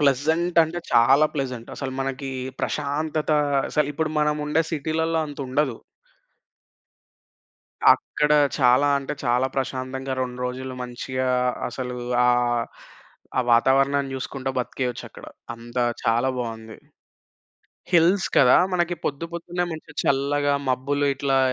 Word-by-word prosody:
Pleasant 160 +5 +1
అంటే 165 +2 -3
చాలా 135 +6 +5
pleasant. 130 -4 -4
అసలు 135 -2 -5
మనకి 135 0 -3 0.3
ప్రశాంతత 150 +2 -2 0.4
అసలిప్పుడు 150 +1 0
మనం 150 0 +2
ఉండే 160 +2 +2
సిటీ‌లల్ల 160 +1 -1
అంతుండదు. 140 -2 -2 2.1
అక్కడ 150 0 +2 0.3
చాలా 130 +2 +4
అంటే 135 - -5
చాలా 125 +2 +2
ప్రశాంతంగా 130 0 -3
రొండ్రోజులు 125 +1 -4
మంచిగా 130 +1 -3 0.4
అసలు 125 0 -5 0.3
ఆహ్, 120 -1 +2 0.7
ఆ - - +5
వాతావరణాన్ని 135 +3 +3
జూసుకుంటా 135 0 -4
బ్రతికేయొచ్చక్కడ. 125 -1 -4 0.3
అంత 120 +1 -13 0.3
చాలా 120 +3 +2
బావుంది. 110 -2 -6 1.2
హిల్స్ 175 +2 +4
కదా! 125 -2 +7 0.2
మనకి 175 -1 0
పొద్దు 145 +3 -2
పొద్దున్నే 175 +1 -3
మంచిగా 160 -1 -9
చల్లగా 145 +1 +1 0.2
మబ్బులు 140 +3 0
ఇట్లా 135 0 +1
135 Hz, 105 wpm, -24 LUFS, 125-150 Hz, 2.1 s, కదా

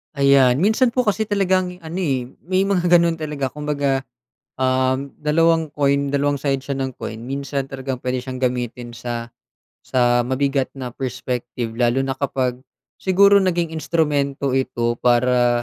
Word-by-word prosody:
Ayan, 140 -3 +5
minsan 235 +4 +3
po 250 - +3
kasi 215 -1 0
talagang 185 -3 +1
ano, 165 +3 -5
eh, 135 -8 0 0.2
may 185 +1 +2
mga 190 -3 +1
ganon 170 -1 +4
talaga 145 -4 -3
kumbaga, 145 -2 -1 0.6
uhm, 130 +1 +1
dalawang 160 0 +2
coin, 140 -1 +2
dalawang 140 0 0
side 135 -1 -1
siya 135 0 -4
ng 130 -1 -3
coin 110 - -6
minsan 140 0 -3
talagang 135 -1 -5
puwede 125 0 -2
siyang 130 0 -6
gamitin 125 -1 -3
sa 120 0 -5 0.6
sa 120 -1 +2
mabigat 135 +1 0
na 130 -2 -6
perspective 125 -2 -4
lalo 120 +2 +2
na 135 -1 -3
kapag 130 -3 -1 0.4
siguro 200 +2 +5
naging 175 -4 0
instrumento 145 -4 0
ito 120 -3 -1
para, 120 0 +3
140 Hz, 145 wpm, -21 LUFS, 125-160 Hz, 0.6 s, Ayan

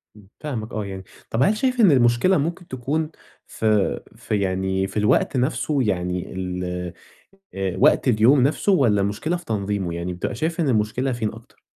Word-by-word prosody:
إمم، 105 -2 -17
فاهمك 120 -8 -5
آه 110 -2 -3
يعني. 95 -1 -7 0.3
طَب 115 +4 +1
هل 210 +9 +2
شايف 255 +2 0
إن 205 -7 +7
المشكلة 120 +7 +4
ممكن 170 +4 -3
تكون 145 +5 -2 0.4
في 105 -3 +1 0.2
في 105 - -2
يعني 95 0 0
في 100 - -7
الوقت 105 +5 +2
نَفْسه؟ 140 +3 0
يعني 90 -4 -2
ال 90 -1 -4 0.9
آآ 95 -2 -2
وقت 140 0 +4
اليوم 120 +4 +5
نَفْسه 150 +9 +2
والّا 115 - +3
مشكلة 105 - -1
في 175 - -10
تنظيمه، 100 - -2
يعني 85 +1 -4
بتبقى 90 - -4
شايف 160 - -2
إن 155 - +1
المشكلة 120 +3 0
فين 115 -3 -2
أكتر؟ 115 +1 -16
110 Hz, 175 wpm, -22 LUFS, 95-145 Hz, 0.9 s, إن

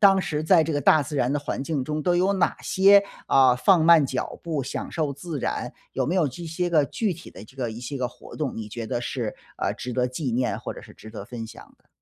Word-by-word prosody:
当 195 -2 +6
时 155 -4 -2
在 165 0 +5
这 160 - -2
个 145 - 0
大 150 +3 +5
自 145 +1 -6
然 125 0 +1
的 145 - +1
环 140 -1 -4
境 140 -3 -2
中， 155 +1 -3
都 175 +2 +2
有 185 +3 +3
哪 185 - +1
些， 200 +1 +6 0.3
呃， 130 -2 +5
放 170 +3 +4
慢 165 -3 +7
脚 130 -1 -4
步 155 -5 -2
享 130 - -5
受 155 -4 -1
自 150 +2 -6
然， - - -3 0.2
有 - - -1
没 170 - 0
有 170 - +3
这 170 +7 -8
些 170 +2 -2
个 155 -4 +4
具 210 +5 -1
体 170 - -12
的 95 - -11
这 130 +5 -19
个 120 -3 -2
一 110 +2 -8
些 140 +3 -5
个 125 -2 -1
活 - - -14
动， 150 -6 -3
你 110 -1 -5
觉 115 +1 -6
得 120 - -2
是， 120 -3 -3 0.2
呃， - - -1
值 125 - -6
得 125 0 +1
纪 130 +1 -3
念 125 +1 0
或 - - -5
者 - - -9
是 - - -14
值 110 - -12
得 105 -3 -7
分 115 -1 -7
享 110 - -12
的？ - - -36
145 Hz, 290 characters per minute, -25 LUFS, 125-165 Hz, 0.3 s, 慢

